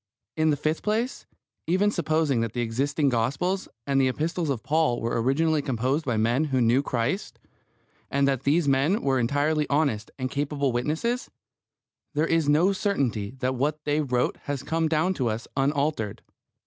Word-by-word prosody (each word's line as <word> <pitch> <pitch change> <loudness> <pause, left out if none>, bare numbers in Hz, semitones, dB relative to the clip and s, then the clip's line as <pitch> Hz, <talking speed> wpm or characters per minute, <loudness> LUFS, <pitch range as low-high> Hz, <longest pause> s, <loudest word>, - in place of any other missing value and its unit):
In 155 0 +2
the 145 - +2
fifth 155 +2 -1
place, 225 +5 -2 0.4
even 190 +4 +2
supposing 155 - +1
that 115 -1 -2
the 120 - -1
existing 135 +5 0
Gospels 135 +11 -1 0.2
and 135 -1 +2
the 130 - +3
Epistles 160 +4 -1
of 130 -5 -2
Paul 150 -6 +1
were 115 0 -1
originally 155 +5 +2
composed 135 +3 -1
by 120 -4 0
men 120 +7 +2
who 135 -3 0
knew 120 +3 +4
Christ, 130 - -2 0.7
and 140 0 +2
that 135 -3 +1
these 145 +3 +2
men 140 +10 +2
were 135 -2 +2
entirely 145 +5 +1
honest 140 -7 +1
and 130 -1 -3
capable 140 -1 -1
witnesses, 160 - -1 0.9
there 150 +2 +2
is 165 -3 +1
no 170 +7 +4
certainty 135 - -1
that 130 +1 +1
what 145 +4 0
they 150 +1 +1
wrote 125 -4 0
has 140 -2 -3
come 160 +2 0
down 160 +4 +1
to 130 -9 -1
us 110 +1 -4
unaltered. 140 -5 -1
140 Hz, 170 wpm, -26 LUFS, 125-160 Hz, 0.9 s, knew